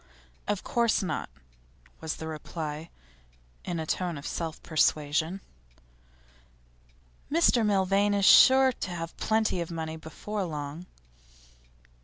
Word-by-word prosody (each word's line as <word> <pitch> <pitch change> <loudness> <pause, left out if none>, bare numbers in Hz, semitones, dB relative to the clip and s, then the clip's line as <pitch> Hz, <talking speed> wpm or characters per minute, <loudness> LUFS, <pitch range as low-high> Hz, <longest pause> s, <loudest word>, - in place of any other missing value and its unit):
'Of 205 -2 -1
course 235 -3 +1
not,' 155 -5 -3 0.7
was 160 -1 -4
the 160 - -7
reply, 155 0 -6 0.7
in 175 -2 -3
a 160 - -3
tone 175 0 -2
of 140 - -9
self 165 -2 -4
persuasion. 155 +3 +1 1.9
'Mr 305 -7 +4
Milvain 200 0 +2
is 200 -1 +2
sure 260 +8 +8
to 220 - -6
have 165 -2 -5
plenty 220 -4 +1
of 170 - -4
money 160 -1 -5
before 195 +6 -5
long. 155 +1 -6
170 Hz, 115 wpm, -28 LUFS, 160-205 Hz, 1.9 s, sure